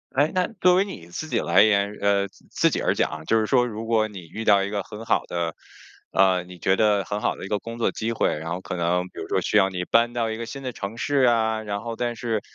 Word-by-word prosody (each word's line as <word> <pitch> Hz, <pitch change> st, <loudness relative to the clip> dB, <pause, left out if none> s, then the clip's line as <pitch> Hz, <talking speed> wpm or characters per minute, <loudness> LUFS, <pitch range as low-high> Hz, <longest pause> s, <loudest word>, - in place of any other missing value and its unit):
诶， 145 Hz, +3 st, +3 dB
那 185 Hz, -1 st, +1 dB
作 180 Hz, -1 st, +5 dB
为 190 Hz, +2 st, +4 dB
你 85 Hz, -, -9 dB
自 155 Hz, -, -6 dB
己 -, -, 0 dB
来 85 Hz, +3 st, +4 dB
言， 100 Hz, -1 st, +3 dB
呃， 100 Hz, -1 st, +2 dB
自 -, -, -24 dB
自 -, -, +2 dB
己 -, -, -1 dB
而 -, -, +1 dB
讲 80 Hz, 0 st, -2 dB
就 115 Hz, +5 st, +3 dB
是 110 Hz, -, +1 dB
说 125 Hz, +1 st, +3 dB
如 110 Hz, 0 st, -6 dB
果 110 Hz, -1 st, +2 dB
你 100 Hz, -4 st, -9 dB
遇 100 Hz, +7 st, -7 dB
到 100 Hz, -2 st, +5 dB
一 100 Hz, -, -4 dB
个 100 Hz, -1 st, -1 dB
很 105 Hz, +4 st, -9 dB
好 -, -, +2 dB
的， 85 Hz, -2 st, -2 dB, 0.6 s
呃， 95 Hz, -2 st, +3 dB
你 90 Hz, 0 st, -12 dB
觉 95 Hz, +3 st, +2 dB
得 105 Hz, -1 st, +3 dB
很 105 Hz, +1 st, -3 dB
好 -, -, 0 dB
的 -, -, -8 dB
一 -, -, -6 dB
个 105 Hz, 0 st, -1 dB
工 115 Hz, 0 st, -8 dB
作 115 Hz, -, +1 dB
机 115 Hz, +1 st, -3 dB
会， 115 Hz, -, +1 dB
然 80 Hz, +1 st, -6 dB
后 90 Hz, +2 st, -3 dB
可 90 Hz, -, -6 dB
能 90 Hz, +1 st, +1 dB
比 -, -, -11 dB
如 -, -, -5 dB
说 -, -, +1 dB
需 -, -, -2 dB
要 95 Hz, -1 st, +4 dB
你 90 Hz, -1 st, -4 dB
搬 120 Hz, +1 st, +3 dB
到 115 Hz, -2 st, -1 dB
一 110 Hz, -, -4 dB
个 115 Hz, -, -5 dB
新 135 Hz, +3 st, -7 dB
的 130 Hz, -, -3 dB
城 105 Hz, 0 st, -6 dB
市 145 Hz, +4 st, -1 dB
啊， 110 Hz, -2 st, +2 dB
然 100 Hz, -1 st, -4 dB
后 115 Hz, -1 st, -4 dB
但 120 Hz, 0 st, -2 dB
是 115 Hz, -2 st, -1 dB
105 Hz, 305 characters per minute, -24 LUFS, 95-115 Hz, 0.6 s, 作